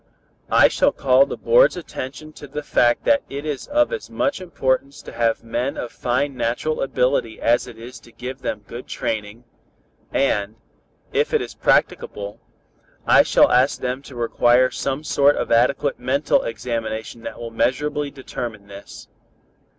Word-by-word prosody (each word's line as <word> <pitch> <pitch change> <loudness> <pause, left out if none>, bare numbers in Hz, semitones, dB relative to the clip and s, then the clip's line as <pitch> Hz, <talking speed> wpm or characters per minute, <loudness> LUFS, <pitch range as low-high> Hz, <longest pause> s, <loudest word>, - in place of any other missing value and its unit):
"I - - +6
shall - - +2
call 135 +1 +4
the - - -5
board's - - +4
attention 155 -2 -7
to 145 - -11
the 150 +2 -6
fact 120 -4 +2
that 285 -1 +3
it 140 +2 -6
is 145 -3 -4
of 300 +7 +2
as 470 - -5
much 280 -8 -1
importance 140 -4 -1
to - - -9
have 115 -1 0
men 120 +4 -2
of 120 - -5
fine 130 +3 -1
natural 120 +6 -1
ability 125 -3 0
as 120 +2 +2
it 120 -2 -11
is 120 +2 -10
to 120 - -18
give 130 +3 -7
them 105 -1 -4
good 120 +4 -9
training, 110 +2 -4 0.7
and, 105 -6 0 0.6
if - - +1
it - - +3
is - - -8
practicable, 100 0 0 0.6
I - - +7
shall - - +4
ask 130 +3 +3
them 125 +1 -3
to 140 - -13
require 120 +1 +3
some 135 +2 -3
sort 145 -1 +3
of - - -3
adequate 125 +4 +2
mental 135 +4 +1
examination 115 -1 -4
that - - -7
will 115 -1 -6
measurably 145 +5 0
determine 120 -6 -7
this. 100 0 -12
125 Hz, 160 wpm, -21 LUFS, 115-140 Hz, 0.7 s, I